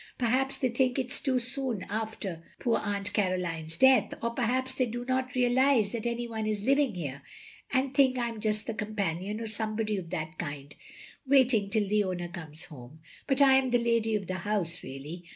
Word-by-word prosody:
Perhaps 260 +3 +1
they 255 - +1
think 250 +1 +1
it 255 -2 -1
too 260 -1 0
soon 250 -4 -1
after 210 -5 -4 0.2
poor 235 - +1
Aunt 205 0 -3
Caroline's 175 -5 -1
death; 265 -3 +5
or 235 - 0
perhaps 255 +2 0
they 255 -1 0
do 240 +2 -5
not 260 0 -1
realise 250 -3 +3
that 235 0 -3
any 235 0 -2
one 220 -2 -3
is 210 -2 -1
living 275 -3 +2
here, 140 -5 -5 0.5
and 265 0 +1
think 265 -2 +4
I 240 -1 0
am 230 -2 -7
just 215 0 0
the 230 - -3
companion, 205 -2 -3
or 230 - -4
some 215 0 -1
body 215 -2 -1
of 175 -3 -6
that 160 -2 -5
kind, 145 -1 -5 0.5
waiting 255 -7 +4
till 210 0 +1
the 210 +1 +2
owner 180 -2 -3
comes 165 -2 -9
home. 145 -2 -12 0.3
But 270 +1 +4
I 270 -1 +7
am 265 -1 +1
the 245 - +4
lady 230 -2 +1
of 200 -2 -2
the 185 +1 -3
house 180 -3 -2
really. 145 +6 -8
220 Hz, 200 wpm, -29 LUFS, 185-255 Hz, 0.5 s, I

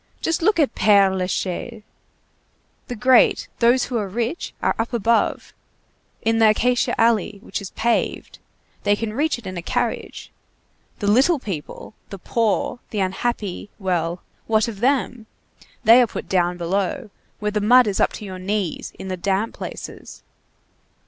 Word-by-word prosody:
Just 330 +1 -1
look 385 +1 +2
at 285 -7 +2
Père 200 -2 +4
Lachaise! 190 +4 -3 1.0
The 245 - -5
great, 250 +2 +4
those 240 +2 +4
who 245 - -2
are 210 -3 -2
rich, 235 - -3
are - - +1
up 230 +2 -2
above, 230 0 +1 0.7
in 225 0 +2
the 220 -1 +6
acacia 245 +3 +1
alley, 225 -3 +2
which 215 - -5
is 195 - -7
paved. 235 0 -1 0.4
They 205 0 +2
can 215 0 -4
reach 300 +5 0
it 240 - -14
in 185 -1 -6
a - - -3
carriage. - - -3 0.7
The - - -4
little 260 +11 +4
people, 195 - -7 0.2
the 195 - -7
poor, 230 +5 -1
the 210 - -3
unhappy, 200 +1 -2
well, 175 -3 -2 0.2
what 220 0 +2
of 215 -4 -6
them? 245 -2 0 0.6
they 230 +3 +8
are 245 - +3
put - - -7
down 180 -1 +1
below, 190 +4 -2 0.3
where 210 0 -2
the 210 0 -1
mud 245 +4 +6
is 205 -2 -1
up - - +3
to 210 - -7
your 185 -2 -7
knees, 195 -2 -3
in 190 - -8
the 185 -1 -3
damp 195 +4 -1
places. - - -9
215 Hz, 160 wpm, -22 LUFS, 190-240 Hz, 1.0 s, they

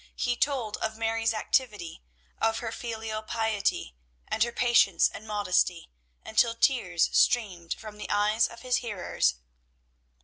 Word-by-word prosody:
He 245 -1 0
told 245 -6 -1
of 220 0 -3
Mary's 225 0 0
activity, 215 - -1 0.4
of 225 0 +1
her 225 -1 -4
filial 220 -2 -5
piety, 220 - -1 0.3
and 220 - -3
her 235 +1 +3
patience 235 -7 +4
and 215 - -10
modesty, 185 - 0 0.3
until 230 +1 +2
tears 230 -9 +2
streamed 185 -8 +2
from 210 -1 -11
the - - -6
eyes 210 +2 +3
of 235 - -12
his 250 -1 +1
hearers. 185 - -1
220 Hz, 135 wpm, -28 LUFS, 205-235 Hz, 0.4 s, patience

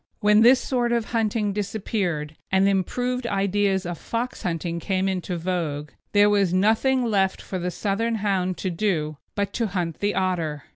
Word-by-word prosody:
When 210 +1 +5
this 250 +3 +7
sort 245 -2 0
of 235 -2 -1
hunting 215 -2 0
disappeared, 190 -7 -2 0.2
and 190 +1 +4
improved 245 +6 0
ideas 195 -2 +1
of 175 -1 -4
fox 235 +2 -3
hunting 170 -1 -2
came 190 +2 0
into 185 -1 -2
vogue, 160 -4 -3 0.2
there 205 0 +6
was 200 -3 +3
nothing 225 +6 +3
left 195 -4 +1
for 185 - -5
the 180 +1 -2
Southern 215 +5 -1
Hound 190 -4 0
to 185 - -2
do 165 -5 -1 0.2
but 200 -1 -1
to 230 -2 0
hunt 175 -4 -3
the 205 0 0
otter. 165 -6 -1
195 Hz, 165 wpm, -24 LUFS, 180-215 Hz, 0.2 s, this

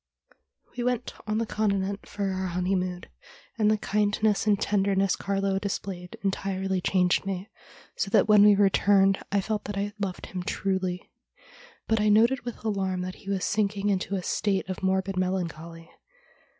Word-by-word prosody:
' - - -37
We 240 - -1
went 250 -1 -1
on 215 0 0
the 230 - 0
Continent 200 -2 -1
for 200 -2 -2
our 190 0 -2
honeymoon, 180 0 -1 0.6
and 210 -1 +4
the 215 - +3
kindness 210 +1 +1
and 205 -2 +3
tenderness 195 -1 +1
Carlo 195 -1 -1
displayed 195 -3 -5
entirely 190 -1 -1
changed 180 -1 +2
me, 195 +1 -4 0.4
so - - -1
that - - +4
when 210 -1 +7
we 210 -1 +7
returned 195 0 +4
I 200 0 +2
felt 210 +1 -3
that 205 -1 -4
I 205 +1 -2
loved 195 -3 -4
him 185 - -5
truly. 185 0 -2 0.8
But 220 -1 +2
I 210 - +3
noted 230 +5 +4
with 240 -2 -7
alarm 190 -3 -1
that 185 0 -4
he 195 - -9
was 195 -2 0
sinking 205 -1 0
into 195 0 0
a 185 - -3
state 195 0 0
of 185 - -5
morbid 190 0 0
melancholy. 170 -3 -3
195 Hz, 165 wpm, -27 LUFS, 185-205 Hz, 0.8 s, when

